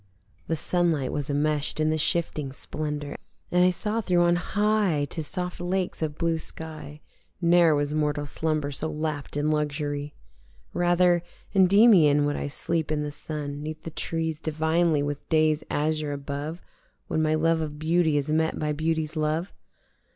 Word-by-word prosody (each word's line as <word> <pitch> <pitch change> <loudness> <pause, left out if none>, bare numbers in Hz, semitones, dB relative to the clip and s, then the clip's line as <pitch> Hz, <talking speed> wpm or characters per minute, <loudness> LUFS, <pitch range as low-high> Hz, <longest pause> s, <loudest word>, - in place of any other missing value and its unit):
The 165 - 0
sunlight 165 -5 +1
was 145 -1 -3
enmesh'd 150 +1 0
in 155 0 +2
the 155 - +1
shifting 150 -4 0
splendour 150 +1 -4 0.3
And 180 0 +4
I 180 - +6
saw 210 +5 -1
through 180 -4 +2
on 175 0 +4
high 205 -4 +1
to 160 - -3
soft 180 +4 -3
lakes 180 0 -2
of 155 -1 -2
blue 165 -1 0
sky: 155 -2 -7 0.4
Ne'er 170 -2 +5
was 145 0 -1
mortal 150 -1 0
slumber 155 0 -1
so 155 +3 -3
lapt 150 -2 -4
in 150 +1 +1
luxury. 145 -1 -2 0.6
Rather 175 0 +3 0.3
Endymion 185 -7 +6
would 145 0 0
I - - -3
sleep 160 +2 -1
in 150 -1 0
the 150 - -4
sun 145 -1 -5
Neath 155 +1 -6
the 165 - -6
trees 160 0 -2
divinely 160 0 +1
with 145 0 -5
day's 155 -1 +3
azure 155 0 0
above 145 +4 -5 0.4
When 160 - -1
my 155 0 +2
love 165 +1 +2
of 150 -1 -4
Beauty 160 0 +2
is 145 +1 -1
met 160 +1 +1
by 150 -1 -1
beauty's 155 +1 -1
love. 155 +4 -1
155 Hz, 160 wpm, -26 LUFS, 150-170 Hz, 0.6 s, I